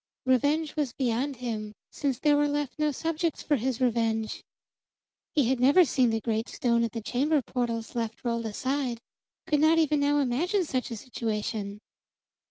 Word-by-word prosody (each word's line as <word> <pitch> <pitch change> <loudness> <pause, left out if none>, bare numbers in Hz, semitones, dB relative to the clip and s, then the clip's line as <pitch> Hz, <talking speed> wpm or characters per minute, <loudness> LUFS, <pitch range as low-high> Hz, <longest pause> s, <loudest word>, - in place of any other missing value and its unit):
Revenge 290 +5 +2
was 290 -6 -1
beyond 260 +2 -1
him, 220 -4 -4 0.2
since 275 -4 -1
there 295 +2 +3
were 290 0 +3
left 290 -1 -2
no 300 -1 +2
subjects 325 +3 -2
for 295 - +2
his 255 -1 -1
revenge. 225 -3 0 0.9
He 285 -6 +3
had 260 0 +1
never 285 +8 +6
seen 255 -3 +2
the 225 0 0
great 225 0 -2
stone 235 -1 +1
at 230 - -1
the 230 -2 -5
chamber 290 +7 +1
portals 230 -2 -3
left 230 -1 -3
rolled 235 -1 -1
aside; 255 +2 -2 0.5
could 295 - +2
not 315 +2 +5
even 305 -2 +3
now 290 +1 +2
imagine 320 - +1
such 255 -4 -2
a 235 - -4
situation. 210 -3 -3
255 Hz, 170 wpm, -28 LUFS, 230-290 Hz, 0.9 s, never